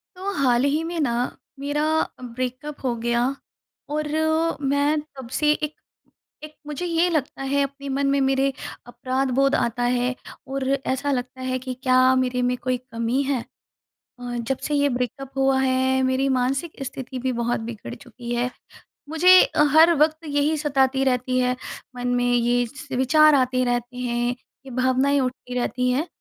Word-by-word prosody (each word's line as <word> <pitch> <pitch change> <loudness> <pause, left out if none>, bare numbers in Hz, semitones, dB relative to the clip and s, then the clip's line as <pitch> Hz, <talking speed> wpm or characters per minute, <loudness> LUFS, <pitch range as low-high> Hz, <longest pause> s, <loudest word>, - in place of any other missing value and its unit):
तो 385 +2 -4
हाल 245 -1 +3
ही 300 +3 +1
में 335 0 -4
ना 270 -6 +1 0.5
मेरा 290 +2 -1 0.4
ब्रेकअप 255 +4 -5
हो 250 -2 0
गया 235 +1 0 0.7
और 305 0 -1 0.6
मैं 285 +2 +2
तब 270 -5 -12
से 300 -1 +4
एक 300 0 -3 0.7
एक 305 0 -10
मुझे 300 +4 -4
ये 340 +1 +2
लगता 300 -5 -2
है 280 +1 +1
अपने 280 0 -6
मन 275 +1 0
में 280 - +2
मेरे 270 +1 +2 0.4
अपराध 260 +2 -2
बोध 275 +2 +3
आता 240 +1 0
है 250 +1 0 0.3
और 265 0 -3
ऐसा 275 +1 -1
लगता 255 0 -3
है 255 0 -2
कि 255 0 -5
क्या 255 0 +5
मेरे 255 -1 0
में 250 0 +1
कोई 255 0 -1
कमी 240 +1 -2
है? 270 -3 -1 0.8
अ, 245 0 -5
जब 235 +3 -2
से 300 - -2
ये 285 0 +3
ब्रेकअप 255 +1 -3
हुआ 270 0 +3
है 260 0 +2
मेरी 260 +1 +1
मानसिक 270 +4 -1
स्थिति 260 0 -6
भी 255 +1 -1
बहुत 235 0 -1
बिगड़ 225 - -7
चुकी 240 -1 -7
है। 240 +1 0 0.6
मुझे 360 +4 +7
अ, - - +2
हर 325 +2 +7
वक़्त 315 0 +2
यही 290 +1 +1
सताती 270 -2 +1
रहती 255 -1 +1
है, 250 0 +1 0.4
मन 245 0 -3
में 245 0 +1
ये 245 0 +2
स 260 +3 -11
विचार 305 +4 +5
आते 255 -1 +2
रहते 245 0 -2
हैं, 240 -1 -1 0.4
ये - - -9
भावनाएँ 260 +3 +2
उठती 255 -1 -4
रहती 250 +1 0
हैं 275 +6 0
260 Hz, 170 wpm, -23 LUFS, 250-285 Hz, 0.8 s, मुझे